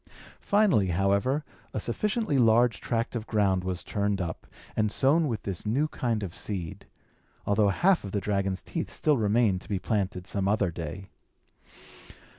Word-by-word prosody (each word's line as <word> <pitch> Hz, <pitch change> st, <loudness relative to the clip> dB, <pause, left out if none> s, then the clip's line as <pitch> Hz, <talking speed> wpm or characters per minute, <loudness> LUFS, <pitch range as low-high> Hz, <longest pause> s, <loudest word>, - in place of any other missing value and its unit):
Finally, 200 Hz, -, +3 dB
however, 100 Hz, -, +1 dB, 0.3 s
a -, -, 0 dB
sufficiently 210 Hz, -, 0 dB
large 115 Hz, 0 st, +4 dB
tract 115 Hz, +1 st, -2 dB
of 115 Hz, -1 st, -4 dB
ground 100 Hz, -4 st, +1 dB
was 90 Hz, -1 st, -3 dB
turned 100 Hz, -1 st, -1 dB
up, 85 Hz, -3 st, -5 dB, 0.3 s
and 110 Hz, -1 st, +1 dB
sown 150 Hz, +7 st, +3 dB
with 115 Hz, -5 st, -3 dB
this 95 Hz, -3 st, -4 dB
new 130 Hz, +8 st, +1 dB
kind 115 Hz, -7 st, -1 dB
of 90 Hz, -4 st, -5 dB
seed; 90 Hz, -6 st, -5 dB, 0.6 s
although 100 Hz, 0 st, +3 dB
half 180 Hz, -, +3 dB
of 100 Hz, -, -6 dB
the 100 Hz, -, 0 dB
dragon's 100 Hz, -2 st, -1 dB
teeth 165 Hz, -, -4 dB
still 150 Hz, -1 st, +1 dB
remained 105 Hz, -3 st, +2 dB
to -, -, -13 dB
be 100 Hz, -, 0 dB
planted 95 Hz, -2 st, -2 dB
some 100 Hz, 0 st, -1 dB
other 100 Hz, -3 st, +1 dB
day. 85 Hz, +4 st, -7 dB
105 Hz, 160 wpm, -28 LUFS, 95-120 Hz, 0.6 s, large